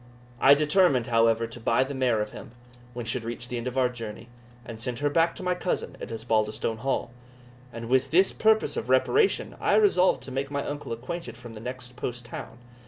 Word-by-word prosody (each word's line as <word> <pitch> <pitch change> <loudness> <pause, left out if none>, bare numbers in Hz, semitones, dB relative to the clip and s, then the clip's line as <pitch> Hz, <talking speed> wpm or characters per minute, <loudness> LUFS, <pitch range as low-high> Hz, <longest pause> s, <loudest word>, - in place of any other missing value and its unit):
I 140 +3 +7
determined, 150 -4 +3
however, 115 -1 +3
to 115 +1 -9
buy 115 +2 +2
the 135 +2 -5
mare 125 -5 +1
of 105 - -9
him, - - -10 0.4
when 120 -1 -4
he 110 - -3
should 125 -2 -3
reach 120 +1 -5
the 125 - -3
end 120 - -5
of 125 +1 -4
our 130 -1 +4
journey, 115 -1 -8 0.4
and 115 -1 -8
send 120 0 -3
her 145 +2 0
back 165 +2 +2
to - - -8
my 180 0 +1
cousin 180 0 -3
at - - -6
Osbaldistone 110 -1 -1
Hall; 135 -1 -1 0.6
and 115 -1 -7
with 130 +2 +2
this 185 +4 +4
purpose 220 0 +2
of 120 - -4
reparation 390 - +2
I - - +3
resolved 185 - +4
to 130 - -8
make 135 +1 -2
my 140 0 -2
uncle 145 -3 -5
acquainted 120 +1 -5
from 120 -2 -10
the 110 - -9
next 125 +1 -7
post 120 -1 -4
town. 115 0 -8
125 Hz, 215 wpm, -27 LUFS, 115-145 Hz, 0.6 s, I